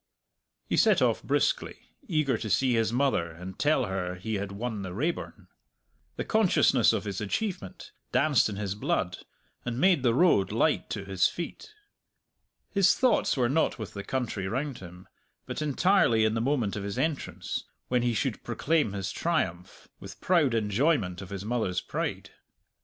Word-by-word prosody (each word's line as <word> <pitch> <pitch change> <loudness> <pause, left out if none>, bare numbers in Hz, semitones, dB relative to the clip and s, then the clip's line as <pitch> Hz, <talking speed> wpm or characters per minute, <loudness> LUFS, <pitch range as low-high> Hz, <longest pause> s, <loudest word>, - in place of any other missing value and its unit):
He - - -1
set - - +5
off - - +2
briskly, - - 0 0.3
eager 155 - +1
to 110 0 -4
see 130 +3 +2
his 115 -1 +1
mother 125 -9 +1
and 90 +3 -9
tell 145 -3 +2
her 95 -2 -3
he 110 +5 -5
had 100 -1 -3
won 110 +1 -4
the 95 -2 -6
Raeburn. 155 +10 -3 0.7
The - - -4
consciousness 220 -5 +4
of - - -1
his 100 -2 -4
achievement 105 - -4 0.2
danced 140 -6 +3
in 105 - -5
his 100 -1 -3
blood, 95 -2 -1 0.4
and 120 0 -3
made 180 -3 +4
the 120 -3 +2
road 135 - +4
light - - +1
to 100 - -4
his 95 -2 +2
feet. 175 - -7 1.0
His 195 -2 +4
thoughts 255 - +2
were 125 -2 +3
not 150 +2 +1
with 110 -2 -7
the 100 - -6
country 115 -7 -3
round 135 +5 -3
him, 90 0 -12 0.4
but - - -5
entirely 150 - +3
in 110 - +1
the 115 - -1
moment 120 -5 0
of 105 - -3
his 100 0 -4
entrance, 155 -3 -2 0.2
when 125 -1 +1
he 120 -1 0
should - - -2
proclaim 150 -9 0
his 95 -1 -3
triumph, 95 - -2
with - - -10
proud 155 -9 +2
enjoyment 105 - +1
of 95 - -9
his 100 0 -6
mother's 110 -6 -1
pride. - - -4
115 Hz, 170 wpm, -28 LUFS, 100-145 Hz, 1.0 s, set